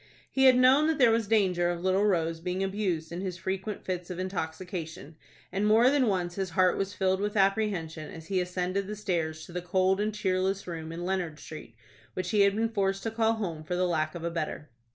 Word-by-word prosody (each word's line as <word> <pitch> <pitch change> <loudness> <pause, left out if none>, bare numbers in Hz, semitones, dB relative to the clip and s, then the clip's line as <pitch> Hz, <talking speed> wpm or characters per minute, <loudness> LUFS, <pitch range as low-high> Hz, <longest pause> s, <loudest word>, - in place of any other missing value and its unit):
He 265 0 +3
had 255 -1 +7
known 265 +4 +5
that 320 -2 +1
there 245 -4 +6
was 225 -2 +1
danger 185 -5 +2
of 175 0 -3
little 190 +2 +2
Rose 165 -5 +1
being 180 +3 -2
abused 190 -5 -2
in 175 +2 -4
his 185 -2 -4
frequent 190 +4 -4
fits 180 -1 -4
of 180 - -5
intoxication, 175 -2 -5 0.4
and 195 +3 0
more 230 +4 +5
than 280 -4 +3
once 180 -4 0
his 190 0 -3
heart 185 -1 +4
was 195 +1 -3
filled 190 -1 +1
with 205 +1 -2
apprehension, 195 -6 0
as 160 -1 -10
he 185 +1 0
ascended 180 +2 -2
the 210 - -4
stairs 165 -6 -2
to - - -13
the 180 +1 -3
cold 185 +2 +1
and 210 0 -1
cheerless 190 0 0
room 165 -2 -6
in 170 +1 -5
Leonard 180 -5 -2
Street, 155 -8 -10 0.4
which 185 - -3
he 210 -2 +3
had 200 0 +4
been 225 +1 +1
forced 195 -3 -1
to 225 - -2
call 225 0 +2
home 175 -8 -4
for 180 +3 -3
the 180 +1 +1
lack 155 -1 -1
of 170 - -6
a 170 - -2
better. 155 -3 -4
185 Hz, 225 wpm, -28 LUFS, 170-205 Hz, 0.4 s, had